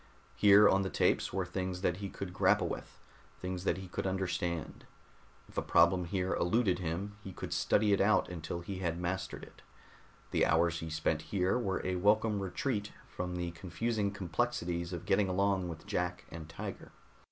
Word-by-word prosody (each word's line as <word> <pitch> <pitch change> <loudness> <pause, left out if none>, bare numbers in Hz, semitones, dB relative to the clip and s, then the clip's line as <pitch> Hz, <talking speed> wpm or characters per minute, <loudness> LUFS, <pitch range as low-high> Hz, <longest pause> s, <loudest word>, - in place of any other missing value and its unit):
Here 105 0 +7
on 95 - +4
the 95 - -1
tapes - - +2
were 95 -1 -1
things 90 0 -3
that 90 -2 +1
he 100 0 -5
could 95 -2 -6
grapple - - +3
with, - - -6 0.4
things 90 0 -4
that 85 - +2
he 95 0 -7
could 90 - -3
understand. 90 -4 -2 0.6
If - - -3
a - - -1
problem 85 +2 +4
here 95 +1 -1
eluded 95 0 +2
him, 95 +5 -3
he 95 - -7
could - - -5
study 105 -1 +3
it 100 - +3
out 105 +2 +4
until 85 0 -5
he 95 +2 -5
had 85 -2 -1
mastered 90 +2 -3
it. - - -14 0.7
The - - +3
hours 85 +1 +2
he 80 - -5
spent 80 0 0
here 95 -2 +1
were 100 -6 -1
a 90 0 0
welcome 105 +2 +3
retreat 105 +3 -2 0.2
from 90 0 -4
the 85 -1 -2
confusing 100 +5 -2
complexities 90 -3 -2
of 90 -1 -5
getting 95 +1 +2
along 95 -1 +1
with 80 -1 -8
Jack 90 0 -2
and 80 -1 -8
Tiger. - - -7
90 Hz, 180 wpm, -32 LUFS, 85-100 Hz, 0.7 s, Here